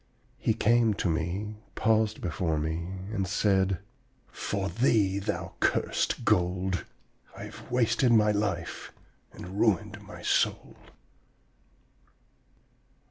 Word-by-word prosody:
He 110 - +1
came 115 -1 +3
to - - -1
me, 90 +6 -2 0.2
paused 110 -1 +2
before 80 -1 -1
me, 85 +5 -3
and 95 -3 -1
said: 95 -1 +2 0.5
'For 100 -1 -2
thee, 105 -4 +2
thou 100 - -3
cursed - - 0
gold, 90 +1 +1 0.5
I - - -7
have - - -10
wasted 120 0 +3
my 105 -2 +5
life 100 -5 -2 0.4
and 95 +3 -8
ruined 105 0 +1
my 105 0 -11
soul!' - - +1
100 Hz, 105 wpm, -28 LUFS, 90-110 Hz, 0.5 s, my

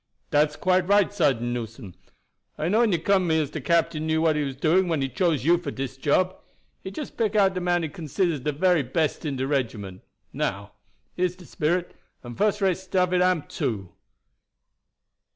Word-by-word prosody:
"Dat's 150 0 +3
quite 185 -1 +1
right, 205 0 +3
Sergeant 135 - +1
Newson. 115 -4 -6 0.6
I 155 - -1
knew 215 +4 +3
when 235 -3 +3
you 175 - +2
came 160 - -13
to - - +1
have 190 - +4
me 160 -3 +1
as 150 -2 -2
de 155 - -5
captain 160 +1 +1
knew 160 0 +1
what 160 -1 +2
he 150 - 0
was 135 -2 -3
doing 170 +7 +2
when 165 -3 0
he 135 - 0
choose 160 -2 0
you 170 +1 +4
for 160 - -5
dis 135 -1 -5
job. 160 +7 +1 0.5
He - - -5
just 270 +9 -7
pick 220 -2 0
out 195 -2 +4
de 185 - -3
man 175 -1 +1
he 160 - -2
considers 165 +1 -1
de 150 +4 -1
very 175 +2 +2
best 150 +5 -1
in 145 -3 -2
de 130 0 -2
regiment. 110 -9 -3 0.3
Now, - - -3 0.4
here 180 - +1
is 180 0 -2
de 180 -1 -14
spirit; 175 +2 -1 0.3
and 120 -1 -8
fuss 210 - +1
rate 190 -3 +2
stuff 185 -1 0
it 180 - +3
am, 180 -4 +2
too." 110 - -3
160 Hz, 210 wpm, -25 LUFS, 140-185 Hz, 0.6 s, have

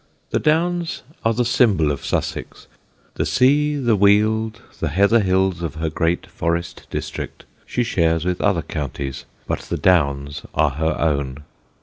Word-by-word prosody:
The - - +1
Downs 170 +2 0 0.2
are 115 - +3
the 120 +1 +1
symbol 105 - +3
of 70 - -4
Sussex. - - -3 0.5
The - - +1
sea, 145 +3 +3
the 120 -6 +2
Weald, 110 +3 +2 0.2
the 80 - -1
heather 100 +8 +4
hills 95 -3 +1
of 85 -2 -4
her 80 0 -2
great 85 +2 0
forest 85 +1 -3
district, - - -5 0.2
she 125 - 0
shares 85 -7 +1
with 90 -1 -1
other 100 -6 +2
counties, 70 -2 -5 0.2
but - - -1
the - - -4
Downs 70 -5 +1
are 75 -2 +3
her 80 +4 -1
own. 70 -3 -1
90 Hz, 150 wpm, -21 LUFS, 80-115 Hz, 0.5 s, heather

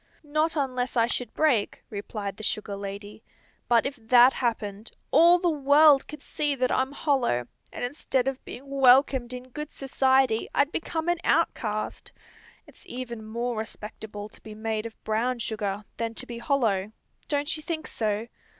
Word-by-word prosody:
"Not 305 +2 0
unless 255 -3 -1
I 230 - +5
should 245 +1 -3
break," 265 -10 +1
replied 200 -1 -5
the - - -10
sugar 210 -1 -2
lady. 200 +2 -7 0.5
"But 235 -1 +4
if 275 +1 -3
that 245 +3 +6
happened, 220 -3 -3 0.2
all 340 +2 +7
the 355 - 0
world 290 0 +5
could 300 -2 -10
see 295 -2 0
that 255 -1 0
I'm 265 +1 +1
hollow, 265 - +1 0.3
and - - -6
instead 255 0 -1
of 270 -1 -3
being 270 +3 -9
welcomed 265 -2 +4
in 250 0 -8
good 300 +3 -6
society 265 -3 +2
I'd 285 +2 +3
become 325 0 -3
an 345 -1 +1
outcast. 215 -10 0 0.5
It's - - -16
even 235 -3 -6
more 235 +2 -3
respectable 210 -1 -6
to - - -16
be 215 -1 -10
made 220 0 -2
of 225 - -16
brown 230 +4 0
sugar, 210 -3 -3
than 230 -1 -3
to - - -4
be 235 -1 -7
hollow; 220 -7 +1 0.4
don't 290 +1 0
you 310 - -6
think 315 0 -4
so?" 215 0 -1
245 Hz, 165 wpm, -27 LUFS, 220-280 Hz, 0.5 s, all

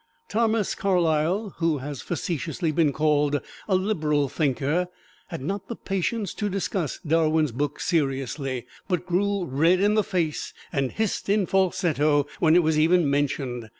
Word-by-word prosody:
Thomas 220 -1 +1
Carlyle, 180 +2 +1
who 165 -3 +1
has 140 0 -6
facetiously 165 0 -2
been 155 -1 +2
called 150 -1 +2 0.3
a 195 - +2
liberal 155 -8 +1
thinker, 145 +4 0 0.4
had 165 -6 -6
not 195 +5 -3
the 235 - -5
patience 195 +1 -2
to 210 -1 -2
discuss 190 -5 -2
Darwin's 155 -2 +2
book 145 +4 -2
seriously, 135 -4 -1 0.2
but 180 -2 -1
grew 195 +1 0
red 165 +6 +3
in 205 +2 +3
the 215 0 +3
face 170 -6 -2 0.2
and 135 -4 0
hissed 220 -2 -2
in 205 -1 +3
falsetto 170 -6 +2
when 160 -1 +4
it 175 - +5
was 155 -1 +2
even 165 +1 +4
mentioned. 130 -5 -1
165 Hz, 150 wpm, -25 LUFS, 145-190 Hz, 0.4 s, it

